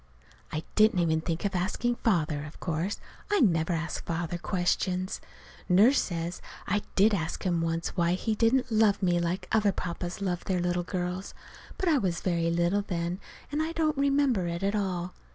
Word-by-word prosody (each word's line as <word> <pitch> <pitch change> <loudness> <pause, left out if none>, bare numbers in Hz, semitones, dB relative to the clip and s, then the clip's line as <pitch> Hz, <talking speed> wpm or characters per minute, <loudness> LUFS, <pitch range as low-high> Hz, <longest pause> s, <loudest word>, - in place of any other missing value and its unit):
I 155 0 -3
didn't 215 -2 +4
even 160 -2 +2
think 165 +3 -3
of 200 - 0
asking 190 +6 0
Father, 155 -9 +1
of 150 +1 -10
course. 170 +4 -2 0.3
I 410 - +3
never 170 - +3
ask 165 +1 -3
Father 170 +1 -3
questions. 185 +1 -1 0.5
Nurse 215 +10 +6
says 170 -1 -4 0.2
I 205 +1 +1
did 210 +3 +5
ask 160 -5 -2
him 175 -3 +1
once 165 0 -1
why 170 -1 +1
he 215 +4 -1
didn't 230 +3 +2
love 215 -2 +3
me 175 -1 +3
like 180 +2 -2
other 210 -2 +3
papas 175 0 -4
loved 180 -3 -2
their 185 -2 +1
little 175 0 0
girls. 180 +1 -4 0.4
But 380 - -1
I 310 -4 +4
was 180 -5 -1
very 170 -2 +1
little 170 +4 +2
then, 175 -2 -3 0.3
and 295 +1 0
I 320 +1 -2
don't 315 -2 +1
remember 275 -8 +2
it 170 +2 -3
at 200 +1 +1
all. 185 -3 -2
180 Hz, 180 wpm, -28 LUFS, 170-210 Hz, 0.5 s, Nurse